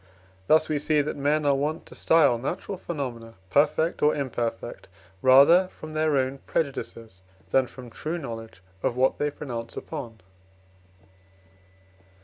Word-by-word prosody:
Thus 155 Hz, 0 st, +5 dB
we 150 Hz, -1 st, 0 dB
see 150 Hz, 0 st, +2 dB
that 145 Hz, -, -3 dB
men 145 Hz, +2 st, +1 dB
are 140 Hz, -, +4 dB
wont 150 Hz, +4 st, -2 dB
to -, -, -12 dB
style 145 Hz, -8 st, +4 dB
natural 175 Hz, +9 st, -4 dB
phenomena 125 Hz, -10 st, -6 dB, 0.2 s
perfect 160 Hz, +3 st, +2 dB
or 150 Hz, +1 st, +4 dB
imperfect 120 Hz, -5 st, -4 dB, 0.3 s
rather 140 Hz, +8 st, +7 dB
from 155 Hz, -3 st, -11 dB
their 155 Hz, -2 st, +2 dB
own 130 Hz, +1 st, -1 dB
prejudices, 115 Hz, -, -3 dB, 0.3 s
than 130 Hz, -1 st, +3 dB
from 125 Hz, -2 st, -11 dB
true 155 Hz, +8 st, -4 dB
knowledge 115 Hz, -, -8 dB, 0.2 s
of 120 Hz, -, -1 dB
what 130 Hz, +1 st, +2 dB
they 150 Hz, -, +1 dB
pronounce 120 Hz, -5 st, -6 dB
upon. 120 Hz, -, -7 dB
140 Hz, 135 wpm, -26 LUFS, 120-155 Hz, 0.3 s, rather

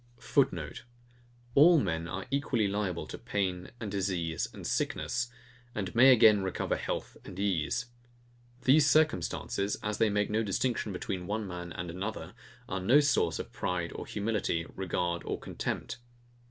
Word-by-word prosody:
[Footenote: 135 Hz, +2 st, 0 dB, 0.7 s
All 165 Hz, +6 st, +7 dB
men 85 Hz, -7 st, -1 dB
are 95 Hz, +2 st, -5 dB
equally 135 Hz, -6 st, +1 dB
liable 100 Hz, -4 st, -2 dB
to -, -, -8 dB
pain 95 Hz, -3 st, -2 dB
and 110 Hz, -4 st, -5 dB
disease 90 Hz, -5 st, -1 dB
and -, -, -10 dB
sickness; 120 Hz, -1 st, -1 dB, 0.5 s
and 95 Hz, -4 st, -3 dB
may 130 Hz, +3 st, +8 dB
again 110 Hz, -4 st, +7 dB
recover 95 Hz, -1 st, -1 dB
health -, -, -4 dB
and 90 Hz, -, -10 dB
ease. 100 Hz, +2 st, 0 dB, 0.8 s
These 145 Hz, +2 st, +5 dB
circumstances, 105 Hz, -, +1 dB
as 105 Hz, 0 st, -2 dB
they 110 Hz, -, +4 dB
make 105 Hz, 0 st, 0 dB
no 110 Hz, +1 st, +2 dB
distinction 110 Hz, +2 st, -1 dB
between 90 Hz, -1 st, -4 dB
one 105 Hz, +1 st, -2 dB
man 90 Hz, -2 st, -6 dB
and 85 Hz, +1 st, -5 dB
another, 100 Hz, +5 st, -5 dB, 0.3 s
are 95 Hz, -, -2 dB
no 120 Hz, +10 st, +6 dB
source 145 Hz, -3 st, +2 dB
of -, -, -7 dB
pride 85 Hz, -2 st, -2 dB
or -, -, -7 dB
humility, 105 Hz, -6 st, -1 dB
regard 90 Hz, -2 st, -1 dB
or -, -, -3 dB
contempt. 115 Hz, +1 st, -4 dB
100 Hz, 150 wpm, -30 LUFS, 90-115 Hz, 0.8 s, may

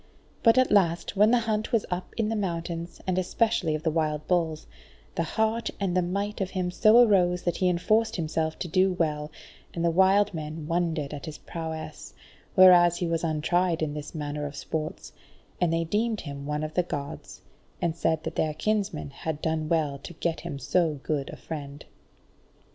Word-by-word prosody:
But 230 Hz, +1 st, +5 dB
at 255 Hz, 0 st, +4 dB
last 175 Hz, -2 st, +2 dB
when 210 Hz, +2 st, +5 dB
the 245 Hz, -, +5 dB
hunt 215 Hz, 0 st, -1 dB
was 230 Hz, -4 st, +2 dB
up 180 Hz, +1 st, -4 dB
in 220 Hz, -2 st, +1 dB
the 225 Hz, -, -1 dB
mountains, 170 Hz, -3 st, -3 dB
and 185 Hz, -1 st, +1 dB
especially 185 Hz, -4 st, +1 dB
of 155 Hz, -, -5 dB
the 160 Hz, -, +1 dB
wild 155 Hz, -1 st, -1 dB
bulls, 165 Hz, -4 st, 0 dB, 0.5 s
the -, -, -1 dB
heart 220 Hz, +7 st, 0 dB
and 190 Hz, -3 st, -1 dB
the 185 Hz, -, +4 dB
might 200 Hz, +4 st, -2 dB
in 190 Hz, -, 0 dB
him 185 Hz, -1 st, -2 dB
so 215 Hz, +5 st, +6 dB
arose 180 Hz, -3 st, +3 dB
that 175 Hz, -, -1 dB
he 185 Hz, -, +2 dB
enforced 215 Hz, +6 st, +2 dB
himself 160 Hz, -1 st, -1 dB
to 180 Hz, -, -4 dB
do 185 Hz, +2 st, +3 dB
well, 150 Hz, -4 st, -1 dB, 0.5 s
and 170 Hz, 0 st, -1 dB
the 170 Hz, -, +3 dB
wild 190 Hz, +3 st, +4 dB
men 155 Hz, -1 st, -5 dB
wondered 165 Hz, -3 st, -1 dB
at 145 Hz, +1 st, -7 dB
his 155 Hz, -, -6 dB
prowess, 160 Hz, -2 st, -7 dB, 0.4 s
whereas 175 Hz, -2 st, +7 dB
he 175 Hz, -, -1 dB
was 165 Hz, 0 st, -1 dB
untried 165 Hz, +2 st, +1 dB
in 150 Hz, -2 st, -2 dB
this 150 Hz, +2 st, -7 dB
manner 150 Hz, -1 st, -3 dB
of 145 Hz, -, -9 dB
sports, 155 Hz, +3 st, -5 dB, 0.5 s
and 175 Hz, -2 st, +3 dB
they 165 Hz, 0 st, +1 dB
deemed 215 Hz, +6 st, 0 dB
him 140 Hz, -2 st, -7 dB
one 150 Hz, +1 st, -2 dB
of 155 Hz, 0 st, -4 dB
the 180 Hz, -, +3 dB
Gods, 145 Hz, -5 st, -6 dB, 0.4 s
and 165 Hz, -2 st, -1 dB
said 160 Hz, -1 st, 0 dB
that -, -, -4 dB
their 155 Hz, -1 st, 0 dB
kinsman 205 Hz, -7 st, -1 dB
had 150 Hz, +2 st, -4 dB
done 160 Hz, -1 st, -1 dB
well 150 Hz, -4 st, 0 dB
to 155 Hz, -, -9 dB
get 165 Hz, 0 st, -2 dB
him 140 Hz, -, -6 dB
so 160 Hz, 0 st, +1 dB
good 145 Hz, -3 st, -2 dB
a -, -, -8 dB
friend. 145 Hz, -2 st, -7 dB
170 Hz, 195 wpm, -27 LUFS, 155-190 Hz, 0.5 s, whereas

